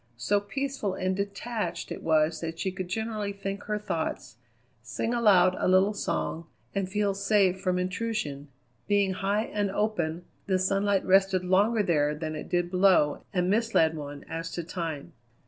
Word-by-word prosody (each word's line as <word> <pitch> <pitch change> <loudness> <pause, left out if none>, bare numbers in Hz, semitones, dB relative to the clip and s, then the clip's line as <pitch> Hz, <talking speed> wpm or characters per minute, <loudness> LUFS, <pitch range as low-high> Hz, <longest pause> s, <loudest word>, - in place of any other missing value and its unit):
So 205 +12 +1
peaceful 265 -2 -3
and 185 0 -1
detached 205 +3 -3
it - - -5
was 160 0 +2
that 165 0 -4
she 190 +3 -2
could 185 -1 -5
generally 215 +1 -3
think 195 0 -5
her 210 0 -1
thoughts, 165 - -4 0.4
sing 120 - -3
aloud 195 -6 +5
a - - +1
little 190 +3 +4
song, 170 -4 -3 0.3
and 195 -2 -1
feel 205 0 +1
safe 195 -2 +2
from 185 -2 0
intrusion. 180 -6 -3 0.4
Being 200 -2 +2
high 200 +3 0
and 205 -3 -2
open, 175 -5 -1 0.2
the 190 -2 +2
sunlight 195 +1 +1
rested 190 -1 +4
longer 205 +4 +3
there 150 -5 +1
than 155 0 -4
it 150 - -7
did 175 0 0
below 180 -6 +4
and 180 -2 0
misled 205 -6 +2
one 145 -2 -7
as 165 0 -5
to 170 - -3
time. 165 -4 -5
190 Hz, 165 wpm, -28 LUFS, 165-205 Hz, 0.4 s, aloud